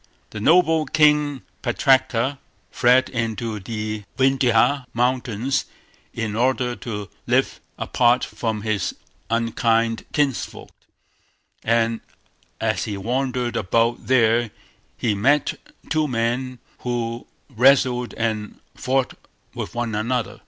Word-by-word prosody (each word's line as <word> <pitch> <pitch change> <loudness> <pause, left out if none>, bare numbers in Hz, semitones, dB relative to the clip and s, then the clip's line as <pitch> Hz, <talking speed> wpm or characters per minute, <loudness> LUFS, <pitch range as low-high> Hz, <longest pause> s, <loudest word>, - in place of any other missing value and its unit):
The 105 - -6
noble 160 - +4
King 150 -2 +3 0.2
Putraka 130 +1 +2 0.3
fled 125 +2 +4
into 115 -2 -3
the 105 +1 -4
Vindhya 135 0 +3
mountains 125 0 0 0.5
in 110 -2 -3
order 125 +1 +1
to 105 -4 -5 0.2
live - - +1 0.2
apart 120 0 +2
from 110 -3 -3
his 110 -4 -1 0.3
unkind 115 0 +1
kinsfolk; 145 -4 -2 0.9
and 115 0 +1 0.6
as 110 -4 0
he 105 -3 -4
wandered 125 +3 -1
about 115 +3 0
there 120 -2 +3 0.5
he 115 -3 0
met 135 +9 +2 0.3
two 155 0 +1
men 125 +1 -1 0.2
who 120 -1 -3 0.3
wrestled 125 0 +3
and 110 -2 -3
fought 130 0 0 0.4
with - - -6
one 120 -2 -2
another. 115 +3 -2
120 Hz, 105 wpm, -22 LUFS, 115-130 Hz, 0.9 s, noble